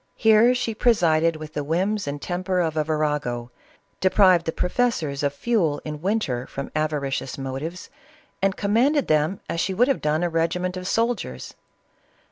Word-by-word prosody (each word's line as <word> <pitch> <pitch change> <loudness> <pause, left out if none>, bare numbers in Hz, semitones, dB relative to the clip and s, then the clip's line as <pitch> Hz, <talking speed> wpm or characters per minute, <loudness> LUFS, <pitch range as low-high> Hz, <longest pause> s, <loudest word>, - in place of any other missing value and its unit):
Here 225 +2 +5
she 245 -2 -2
presided 165 -8 +3
with 155 0 -9
the 145 - -2
whims 190 +6 -1
and 145 +1 -3
temper 180 +3 -2
of 160 -3 0
a 155 - +1
virago, 150 -6 -2 0.5
deprived 185 -3 +4
the - - +1
professors 180 - -1
of 145 -1 +1
fuel 165 -2 0
in 150 -1 -6
winter, 165 - -1
from 140 - -6
avari 150 -3 -1
cious 130 - -4
motives, 135 +6 -6 0.5
and 195 0 +1
commanded 245 +8 +2
them 155 +5 +1
as 165 - -3
she 190 +2 -1
would 245 +6 +4
have 275 - 0
done 155 +3 0
a - - +2
regiment 180 +3 -1
of 185 0 -5
soldiers. 225 - -2
165 Hz, 165 wpm, -23 LUFS, 150-200 Hz, 0.5 s, Here